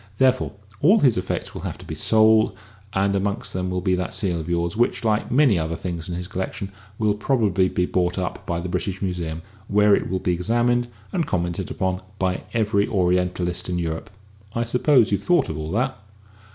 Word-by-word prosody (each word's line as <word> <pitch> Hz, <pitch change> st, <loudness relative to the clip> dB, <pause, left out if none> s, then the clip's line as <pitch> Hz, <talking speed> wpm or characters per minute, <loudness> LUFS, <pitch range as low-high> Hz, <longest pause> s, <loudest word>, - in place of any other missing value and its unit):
Therefore 130 Hz, -3 st, +2 dB, 0.3 s
all 185 Hz, +10 st, +6 dB
his 135 Hz, -, +4 dB
effects 90 Hz, 0 st, -3 dB
will -, -, -6 dB
have -, -, -5 dB
to -, -, -12 dB
be -, -, -6 dB
sold, 110 Hz, 0 st, +4 dB, 0.4 s
and 100 Hz, +1 st, +2 dB
amongst 100 Hz, +1 st, -1 dB
them 90 Hz, 0 st, -2 dB
will 90 Hz, 0 st, -1 dB
be 95 Hz, +1 st, +1 dB
that 90 Hz, 0 st, -2 dB
seal 90 Hz, -4 st, 0 dB
of 80 Hz, +1 st, -6 dB
yours, 85 Hz, 0 st, 0 dB
which, 120 Hz, +2 st, +1 dB
like 110 Hz, -1 st, +1 dB
many 125 Hz, -, +4 dB
other 80 Hz, +1 st, -2 dB
things 85 Hz, 0 st, -5 dB
in 85 Hz, -, -3 dB
his 90 Hz, 0 st, -5 dB
collection, 95 Hz, +1 st, -4 dB, 0.3 s
will 105 Hz, -2 st, +2 dB
probably 105 Hz, -4 st, +2 dB
be 90 Hz, -, 0 dB
bought 90 Hz, 0 st, 0 dB
up 90 Hz, -1 st, -3 dB
by 85 Hz, -1 st, -1 dB
the 90 Hz, -, -4 dB
British 95 Hz, +1 st, -2 dB
Museum, 85 Hz, -3 st, -3 dB, 0.2 s
where 105 Hz, 0 st, +4 dB
it -, -, -2 dB
will 95 Hz, -, 0 dB
be 90 Hz, -1 st, 0 dB
examined 120 Hz, +6 st, +1 dB, 0.3 s
and 170 Hz, -5 st, 0 dB
commented 85 Hz, -1 st, -2 dB
upon 95 Hz, 0 st, -1 dB, 0.2 s
by 95 Hz, -1 st, 0 dB
every 105 Hz, -3 st, +1 dB
Orientalist 90 Hz, -1 st, 0 dB
in 90 Hz, -, -1 dB
Europe. 80 Hz, +4 st, -3 dB, 0.5 s
I 115 Hz, -, +1 dB
suppose 125 Hz, 0 st, +3 dB
you've 100 Hz, -1 st, +1 dB
thought 175 Hz, +6 st, +2 dB
of 80 Hz, -, -4 dB
all 75 Hz, 0 st, -4 dB
that?" 125 Hz, +5 st, 0 dB
95 Hz, 200 wpm, -23 LUFS, 90-110 Hz, 0.5 s, all